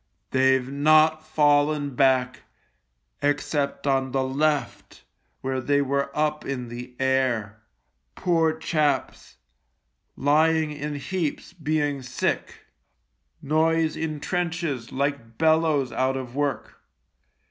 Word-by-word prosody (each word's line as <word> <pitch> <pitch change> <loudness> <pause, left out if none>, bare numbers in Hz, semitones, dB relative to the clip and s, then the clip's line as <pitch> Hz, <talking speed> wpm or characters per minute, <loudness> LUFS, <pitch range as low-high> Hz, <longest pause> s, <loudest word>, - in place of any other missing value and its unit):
They've 130 -1 +3
not 155 +3 +4
fallen 145 -1 +2
back 130 -1 +2 0.8
except 145 0 -1
on 135 -2 +1
the 135 -1 +1
left, 145 +2 -2 0.4
where 130 0 -2
they 140 +3 +2
were 140 0 0
up 150 0 0
in 125 -3 -4
the 125 +1 -8
air. 125 -5 0 0.5
Poor 165 -3 +2
chaps! 155 -2 -1 0.8
Lying 155 +2 +2
in 150 0 -5
heaps 155 +4 -3
being 150 -4 -1
sick. 130 0 -3 0.8
Noise 160 +1 +1
in 155 -2 -3
trenches 165 -8 -3
like 135 -4 -3
bellows 160 -5 +2
out 130 +1 0
of 125 -2 -7
work. 145 -1 -3
145 Hz, 105 wpm, -25 LUFS, 130-155 Hz, 0.8 s, not